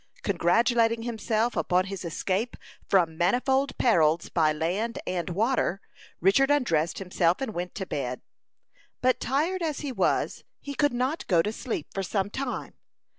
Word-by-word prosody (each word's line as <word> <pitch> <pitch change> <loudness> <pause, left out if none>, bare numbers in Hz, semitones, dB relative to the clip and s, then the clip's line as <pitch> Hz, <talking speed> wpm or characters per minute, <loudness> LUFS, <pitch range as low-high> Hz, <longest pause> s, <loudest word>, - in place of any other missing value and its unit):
Congratulating 230 +5 +2
himself 230 0 -1
upon 180 +1 +2
his 195 -1 -6
escape 190 +7 -2 0.3
from 170 -4 +2
manifold 265 +8 +1
perils 165 -8 +3
by 155 -3 +3
land 190 - -2
and 175 -2 -2
water, 200 0 +1 0.4
Richard 200 +10 +4
undressed 175 - +1
himself 180 -2 +1
and 265 -5 -3
went 175 0 -4
to 190 - -3
bed. 125 -7 -3 0.8
But 255 -1 +3
tired 315 +9 0
as 315 -4 -2
he 290 -3 -3
was, 250 - 0 0.2
he 285 - -6
could 290 +1 +2
not 255 +6 -1
go 170 -4 +4
to 210 - -2
sleep 220 - -4
for 195 - -2
some 195 +2 -1
time. 265 +1 -4
210 Hz, 150 wpm, -27 LUFS, 175-255 Hz, 0.8 s, Richard